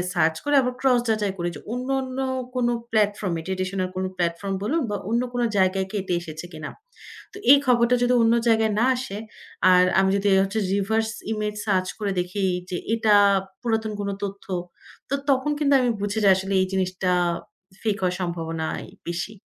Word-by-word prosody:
Search 160 -2 +2
করে 290 - +1
আবার 250 0 -1
cross 255 -2 +4
যাচাই 210 -3 0
করি 175 0 -1
যে - - -8
অন্য, 250 +2 -4
অন্য 260 0 -6 0.4
কোনো 240 -1 +1 0.2
প্লাটফর্ম 205 -3 +1
এ - - -8
ট্রেডিশনাল 185 0 -2
কোনো 185 0 -1
প্ল্যাটফর্ম 175 +3 -1
বলুন 295 +11 0
বা 205 - -1
অন্য 235 +2 +2
কোনো 245 -1 0
জায়গায় 190 0 +2
কেটে 190 -4 -2
এসেছে 160 0 -8
কিনা। 155 -1 -7 0.6
তো - - -12 0.2
এই 285 - +8
খবরটা 240 -1 +4
যদি 245 0 +3
অন্য 225 0 +4
জায়গায় 220 -1 +3
না - - +4
আসে, 225 -5 -5 0.5
আর 180 0 +6 0.2
আমি 190 0 +3
যদি 200 0 +1
হচ্ছে 195 +3 -2 0.2
রিভার্স 220 +3 +1 0.2
ইমেজ 210 -1 -2
সার্চ 185 -3 +1
করে 205 -2 -1
দেখি 180 +3 -2 0.3
যে 180 - -2 0.2
এটা 220 -2 +3 0.5
পুরাতন 220 -2 -1
কোনো 200 0 -2
তথ্য। 200 0 -7 0.6
তো - - +1 0.2
তখন 270 +2 +2
কিন্তু 285 -2 +3
আমি 250 -1 +2
বুঝে 205 +2 -2
যাই 195 - +7
আসলে 190 +1 -2
এই - - 0
জিনিসটা 185 -1 -1 0.7
ফেক 215 -3 0
হওয়ার 180 -1 +1
সম্ভাবনাই 165 -2 -3 0.2
বেশি। 175 +5 -3
200 Hz, 180 wpm, -24 LUFS, 185-230 Hz, 0.7 s, এই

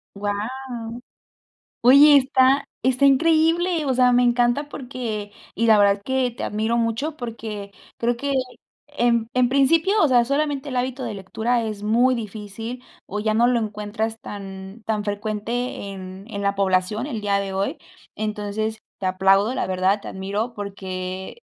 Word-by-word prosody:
¡Guau! 205 0 -2 1.5
Oye, 280 +4 +8
está, 265 +1 +3 0.2
¡está 260 +2 +3
increíble! 325 +3 +3
O 265 - +1
sea, 250 0 +4
me 245 0 +4
encanta 245 +4 +2
porque 235 -7 -5 0.2
y 230 - +1
la 220 - +7
verdad 200 -1 +5
es 200 - -22
que 260 -1 0
te 230 - -7
admiro 220 +3 0
mucho 235 +7 -1
porque 220 -4 -6 0.3
creo 240 +1 0
que, 280 +4 -4
eh, - - +1 0.6
en 235 -2 +2
en 250 -1 +3
principio, 330 +10 +3
o - - +5
sea, 245 -3 +4
solamente 285 +1 -1
el 255 - -5
hábito 255 +1 -2
de 230 - -3
lectura 225 +5 -1
es 215 -2 -5
muy 240 +4 +3
difícil 225 +2 -6 0.2
o 210 - -4
ya 215 +1 0
no 235 +2 +4
lo 245 -1 +2
encuentras 215 +1 -3
tan 195 +1 -9
tan 215 -2 -1
frecuente 210 +2 -3
en 190 0 -9
en 200 -2 -5
la 200 0 0
población 195 +5 +1
el 240 -7 -4
día 200 -1 +1
de 195 -1 -3
hoy. 195 +1 -1 0.4
Entonces, 215 +1 -3 0.2
te 190 - -4
aplaudo, 195 +5 +3
la - - -1
verdad, 185 +2 +1
te - - -9
admiro 200 +5 -3
porque 190 - -6
225 Hz, 165 wpm, -23 LUFS, 205-255 Hz, 1.5 s, Oye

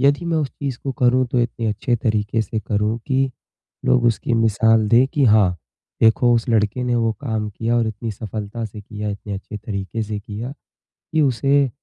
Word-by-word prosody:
यदि 145 +5 +3
मैं 165 -1 0
उस 145 -3 0
चीज़ 135 -4 -5
को 135 - -2
करूँ 125 +1 +3
तो 125 - -1
इतने 120 -1 -2
अच्छे 110 +3 0
तरीके 110 0 0
से 110 +2 -3
करूँ 105 +2 -1
कि 135 -1 +1 0.5
लोग 125 -1 +3
उसकी 115 +1 +1
मिसाल 115 0 +3
दें 120 +4 +5
कि 145 -3 +3
हाँ, 105 -5 +4 0.5
देखो 120 +2 +5
उस 115 +1 0
लड़के 110 +1 +1
ने 125 -1 0
वोह 115 -1 +1
काम 110 -6 -2
किया 115 +3 -1
और 115 -1 +2
इतनी 110 +1 -5
सफलता 105 +2 -5
से 105 -1 -7
किया 105 +1 -6
इतने 100 0 -6
अच्छे 100 +2 -7
तरीके 105 +1 -4
से 105 -1 -4
किया 110 +5 -6 0.4
कि 160 - -2
उसे 140 +1 +3
115 Hz, 195 wpm, -21 LUFS, 105-125 Hz, 0.5 s, दें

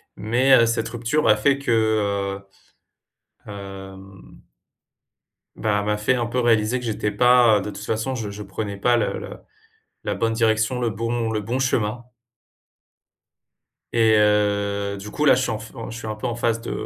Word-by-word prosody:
Mais, 125 +5 +2
heu, 115 - +5
cette 115 0 -1
rupture 120 +6 -1
a 105 - +6
fait 140 +5 +2
que, 140 - -2
heu, 100 -3 -1 0.9
hem, 95 -1 -11 1.1
ben, 105 -2 0
elle 100 - -3
m'a 105 0 0
fait 115 +5 +1
un 120 - -1
peu 120 +2 -2
réaliser 115 +1 +2
que 125 - -8
j'étais 105 -1 -2
pas, 120 -3 +5
heu, - - -4
de 105 - -5
toute - - -8
façon, 115 +4 -2
je 110 -4 -4
je 105 +1 -7
prenais 100 +1 -5
pas 120 +4 +2
la - - -4 0.6
la - - -1
bonne 115 0 -1
direction, 110 +2 +1
le 120 -2 0
bon 115 +1 -2
le 110 -1 -1
bon 120 +5 -3
chemin. 120 -3 -1 1.9
Et 110 -2 +4
heu, 100 -1 +1
du 105 +2 -8
coup, 150 - -1
là 140 - +7
je 130 - 0
suis - - -1
en 110 - -3
f 110 - -11 0.2
je 115 - -7
suis 110 - -7
un 110 - -3
peu 105 - -4
en 120 - -3
phase 115 -1 -1
de 115 - -6
110 Hz, 185 wpm, -22 LUFS, 105-120 Hz, 1.9 s, là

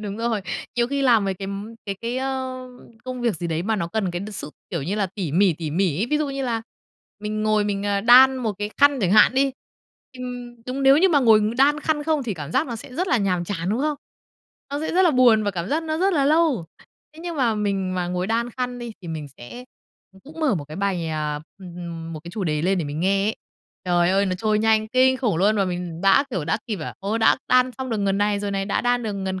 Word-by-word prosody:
Đúng 205 -1 -5
rồi, 230 -2 -1 0.4
nhiều 235 - +2
khi 280 +2 -2
làm 235 -6 +4
mấy 195 -1 -1
cái 195 +1 -6 0.4
cái 200 - -2
cái, 235 +2 -3
ờ, 260 -1 -4 0.4
công 255 -1 -5
việc 235 -6 0
gì 170 +2 -4
đấy 165 0 -2
mà 220 +2 0
nó 170 -3 -2
cần 195 -2 -1
cái 175 +1 -4
sự, 170 - -6 0.2
kiểu, 170 -6 -2
như 180 +8 -2
là 205 -2 0
tỉ 180 -5 -5
mỉ, 190 +1 +4
tỉ 155 -1 -5
mỉ 175 -2 0
ấy. 220 - 0
Ví 300 - +2
dụ 300 -2 -1
như 275 0 -3
là 230 -3 -1 0.6
mình 215 0 -3
ngồi 215 -1 +2
mình 200 -1 -2 0.2
đan 260 +2 +8
một 235 -4 -2
cái 205 0 -3
khăn 285 -1 +4
chẳng 190 -2 +1
hạn 215 +4 +6
đi, 270 0 +2 0.7
ừm, 245 -2 -7
đúng 265 +2 -3
nếu 270 +2 +6
như 380 - +5
mà 295 -5 +3
ngồi 220 -3 +6 0.2
đan 290 +3 +4
khăn 310 -1 0
không 310 -1 0
thì 225 -6 -3
cảm 150 -1 -7
giác 275 - +2
nó 235 -3 -5
sẽ 250 - -11
rất 365 +6 -1
là 360 - +3
nhàm 185 -3 0
chán, 175 -1 -3
đúng 220 +5 0
không? 300 0 0 0.7
Nó 285 - -3
sẽ 315 - -3
rất 370 - +4
là 350 - +5
buồn 245 -5 +5
và 205 - +1
cảm 180 0 -4
giác 315 +3 0
nó 315 0 -2
rất 385 +1 +2
là 280 -3 +2
lâu. 300 - +2 0.5
Thế 320 - -12
nhưng 345 -2 -5
mà 240 -5 +2
mình 195 -3 -1
mà 180 -1 -1
ngồi 180 +1 -2
đan 235 +2 -1
khăn 250 0 -4
đi 240 -1 -6
thì 175 - -8
mình 155 -2 -5
sẽ 240 - -10 0.6
cũng 315 +3 -11
mở 290 -9 +2
một 150 - -4
cái 155 +3 -10
bài 190 -4 -1
à, 150 -1 -2 0.2
m 170 -3 -8
một 155 - -7
cái 170 - -8
chủ 195 +2 -4
đề 150 -2 -1
lên 190 +1 +1
để 165 - -1
mình 145 +2 -4
nghe 195 +2 +2
ấy. 220 - -1 0.5
Trời 175 0 +2
ơi, 195 +1 +2
nó 185 - -1
trôi 215 +3 0
nhanh 220 0 +2
kinh 260 +2 +3
khủng 235 -9 0
luôn 205 +5 +3
và 200 - +2
mình 175 -2 -4
đã 195 +9 +5
kiểu, 185 -10 -2
đã - - 0
kịp, 215 -4 -3 0.2
ô, 205 +4 -1
đã 225 - +4
đan 255 0 +4
xong 260 -2 -4
được 225 - 0
ngần 195 0 0
này 205 0 +1
rồi 205 - -3
này, 195 0 -1
đã 200 - -1
đan 245 0 +1
được 215 -2 -3
ngần 190 -1 -3
215 Hz, 260 wpm, -23 LUFS, 185-255 Hz, 0.7 s, đan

